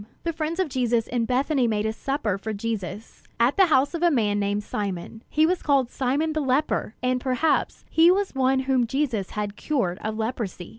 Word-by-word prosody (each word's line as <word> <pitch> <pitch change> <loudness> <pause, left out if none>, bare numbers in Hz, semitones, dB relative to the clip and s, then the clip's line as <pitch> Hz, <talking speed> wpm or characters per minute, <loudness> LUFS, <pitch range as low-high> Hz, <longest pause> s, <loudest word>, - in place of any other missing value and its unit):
The 335 - -1
friends 320 +2 -3
of 375 - +2
Jesus 240 -4 0
in 240 -2 -1
Bethany 260 +1 +1
made 215 -1 0
a 220 - 0
supper 225 -6 -2
for 220 +2 -4
Jesus, 210 -1 -5 0.2
at 240 +4 +3
the 385 -2 +5
house 280 -1 +3
of 335 - -3
a 350 - +5
man 210 -8 +1
named 205 +1 -1
Simon. 200 +1 -4
He 310 +1 +3
was 360 +2 0
called 275 -4 +2
"Simon 285 +5 0
the 310 - -1
leper"; 265 -4 0
and 250 0 +1
perhaps 260 +5 0
he 325 +1 +5
was 390 +2 +1
one 265 0 +2
whom 260 -2 +1
Jesus 240 -7 -1
had 205 -1 -2
cured 220 -13 -1
of 215 0 -3
leprosy. 220 -6 -4
255 Hz, 200 wpm, -25 LUFS, 215-295 Hz, 0.2 s, the